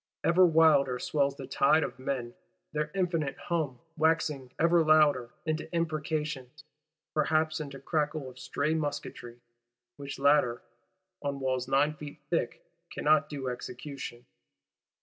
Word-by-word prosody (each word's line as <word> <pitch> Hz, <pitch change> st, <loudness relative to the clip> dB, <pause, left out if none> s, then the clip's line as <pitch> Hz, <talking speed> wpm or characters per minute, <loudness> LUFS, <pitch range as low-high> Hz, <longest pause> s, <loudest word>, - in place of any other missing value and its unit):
Ever 180 Hz, +2 st, +5 dB
wilder 155 Hz, -6 st, +4 dB
swells 140 Hz, +2 st, 0 dB
the 135 Hz, -, -6 dB
tide 140 Hz, +4 st, +3 dB
of -, -, -5 dB
men; 130 Hz, -3 st, -3 dB, 0.4 s
their 150 Hz, 0 st, -1 dB
infinite 170 Hz, -7 st, 0 dB
hum 155 Hz, -7 st, -2 dB, 0.2 s
waxing 155 Hz, -5 st, +1 dB
ever 170 Hz, +1 st, +4 dB
louder, 150 Hz, -6 st, +4 dB, 0.2 s
into 155 Hz, 0 st, -2 dB
imprecations, 155 Hz, -5 st, -2 dB, 0.5 s
perhaps 155 Hz, +1 st, +1 dB
into 140 Hz, -3 st, -6 dB
crackle 150 Hz, 0 st, -1 dB
of 130 Hz, 0 st, -11 dB
stray 145 Hz, +4 st, -1 dB
musketry,—which 120 Hz, -3 st, -7 dB
latter, 140 Hz, -4 st, +3 dB, 0.6 s
on 140 Hz, -1 st, -3 dB
walls 130 Hz, -2 st, -1 dB
nine 140 Hz, +3 st, +3 dB
feet 150 Hz, -1 st, -9 dB
thick, -, -, -1 dB, 0.3 s
cannot 155 Hz, 0 st, +2 dB
do 140 Hz, -3 st, -5 dB
execution. 125 Hz, 0 st, -6 dB
145 Hz, 120 wpm, -29 LUFS, 130-155 Hz, 0.6 s, Ever